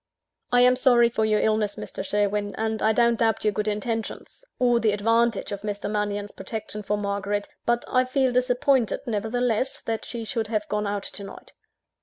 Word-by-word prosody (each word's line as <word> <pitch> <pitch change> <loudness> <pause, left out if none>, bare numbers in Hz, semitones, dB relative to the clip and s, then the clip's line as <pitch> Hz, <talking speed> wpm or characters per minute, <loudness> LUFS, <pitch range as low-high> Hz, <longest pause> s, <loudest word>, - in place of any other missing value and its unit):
"I 245 0 +5
am 250 0 +6
sorry 245 -2 +4
for 220 -2 0
your 215 -1 +2
illness, 215 -2 +1
Mr. - - -6
Sherwin; 205 0 0
and 220 0 -2
I 220 - +4
don't 235 0 +3
doubt 225 -1 +1
your 210 - +4
good 210 +2 -2
intentions, 225 - -3
or 245 -1 +3
the 220 -3 +2
advantage 230 +2 +1
of 200 -1 -4
Mr. 205 -1 -4
Mannion's 205 -1 -2
protection 215 -1 -5
for 210 0 -1
Margaret; 200 0 -2 0.2
but 240 0 +1
I 255 0 +2
feel 260 0 +1
disappointed, 250 0 +2
nevertheless, 235 +2 -1
that 225 -1 -3
she 235 -2 -5
should 225 -2 -2
have 215 -1 -2
gone 210 0 -1
out 200 0 -2
to 200 - -5
night." 195 - -11
220 Hz, 185 wpm, -25 LUFS, 205-240 Hz, 0.2 s, am